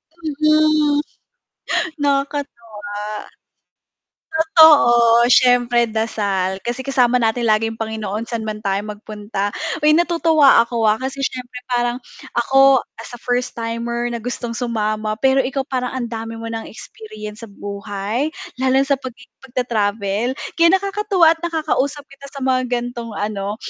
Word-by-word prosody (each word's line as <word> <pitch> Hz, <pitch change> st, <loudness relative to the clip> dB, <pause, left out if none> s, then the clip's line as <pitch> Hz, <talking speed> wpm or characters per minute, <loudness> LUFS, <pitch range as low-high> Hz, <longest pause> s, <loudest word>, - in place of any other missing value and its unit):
Mm. 305 Hz, -1 st, +2 dB, 1.0 s
Nakakatuwa. 235 Hz, -8 st, -3 dB, 1.3 s
Totoo, 285 Hz, -8 st, +6 dB
siyempre 245 Hz, -1 st, +4 dB
dasal 200 Hz, -4 st, -1 dB
kasi 245 Hz, +2 st, -4 dB
kasama 250 Hz, -2 st, +3 dB
natin 230 Hz, 0 st, +1 dB
lagi 215 Hz, +1 st, +2 dB
ang 225 Hz, -, -4 dB
Panginoon 220 Hz, 0 st, -4 dB
saan 225 Hz, -2 st, -3 dB
man 215 Hz, 0 st, -5 dB
tayo 195 Hz, -1 st, 0 dB
magpunta. 210 Hz, -1 st, -5 dB, 0.3 s
Uy 300 Hz, -, +5 dB
natutuwa 325 Hz, -6 st, +4 dB
ako, 235 Hz, -2 st, -1 dB
ah, 210 Hz, -, +5 dB
kasi 265 Hz, +1 st, -4 dB
siyempre 250 Hz, -2 st, -4 dB
parang 240 Hz, 0 st, 0 dB, 0.4 s
ako 270 Hz, +2 st, +5 dB, 0.2 s
as -, -, -10 dB
a 245 Hz, -, -9 dB
first 245 Hz, 0 st, -2 dB
timer 235 Hz, +1 st, -3 dB
na 235 Hz, -2 st, -4 dB
gustong 240 Hz, -1 st, -4 dB
sumama, 215 Hz, -2 st, -2 dB
pero 265 Hz, 0 st, +3 dB
ikaw 270 Hz, +1 st, -3 dB
parang 250 Hz, -2 st, -2 dB
ang 240 Hz, -, -3 dB
dami 225 Hz, 0 st, -6 dB
mo 230 Hz, -, -7 dB
ng 225 Hz, 0 st, -4 dB
experience 215 Hz, -1 st, -10 dB
sa 225 Hz, -, -9 dB
buhay 205 Hz, +7 st, -4 dB, 0.3 s
lalo 260 Hz, 0 st, +3 dB
sa 280 Hz, -, +3 dB
pagi 255 Hz, -2 st, -9 dB, 0.2 s
pagtata-travel. 230 Hz, -2 st, -1 dB, 0.2 s
Kaya 335 Hz, 0 st, +5 dB
nakakatuwa 395 Hz, -3 st, +1 dB
at 325 Hz, -, -22 dB
nakakausap 305 Hz, -4 st, -1 dB
kita 275 Hz, 0 st, -13 dB
sa 280 Hz, -, -9 dB
mga 255 Hz, -1 st, 0 dB
gantong 240 Hz, -1 st, -3 dB
ano, 205 Hz, 0 st, -3 dB
240 Hz, 135 wpm, -19 LUFS, 220-275 Hz, 1.3 s, Totoo